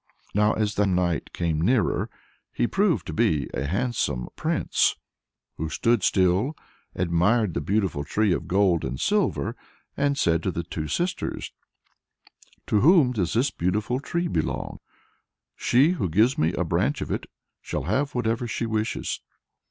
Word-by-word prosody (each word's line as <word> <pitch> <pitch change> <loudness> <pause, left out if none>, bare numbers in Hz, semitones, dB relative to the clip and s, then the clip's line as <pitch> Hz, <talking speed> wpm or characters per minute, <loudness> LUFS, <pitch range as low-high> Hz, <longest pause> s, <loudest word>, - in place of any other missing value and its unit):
Now, 105 +1 +3
as 105 -1 0
the 105 -1 +2
knight 90 -3 0
came 80 -3 -1
nearer, 115 +6 +1 0.4
he - - 0
proved 175 - +1
to 80 - -5
be 75 -1 +1
a 70 - -2
handsome 95 - -1
prince, - - +1 0.6
who 80 +1 -3
stood 115 +8 +1
still, 95 - +2 0.4
admired 90 +4 +2
the 70 - -2
beautiful 95 -3 0
tree 105 +5 +1
of - - -3
gold 95 -3 +2
and 65 - -4
silver, 195 - 0 0.4
and 140 0 +1
said 85 -7 +2
to 95 - -1
the 85 -1 -3
two 80 -2 -5
sisters 175 - -2 1.1
"To 105 - +2
whom 150 - +5
does 95 -8 -1
this 130 +5 +2
beautiful 105 +8 -1
tree 170 +5 -2
belong? - - -2 0.8
She 135 +7 +3
who 165 - -1
gives 110 +11 +3
me 80 +2 +1
a - - 0
branch - - 0
of - - -4
it - - -3 0.3
shall - - -4
have 130 - -1
whatever 120 0 0
she 115 - -2
wishes." 110 -1 -2
105 Hz, 150 wpm, -25 LUFS, 85-125 Hz, 1.1 s, whom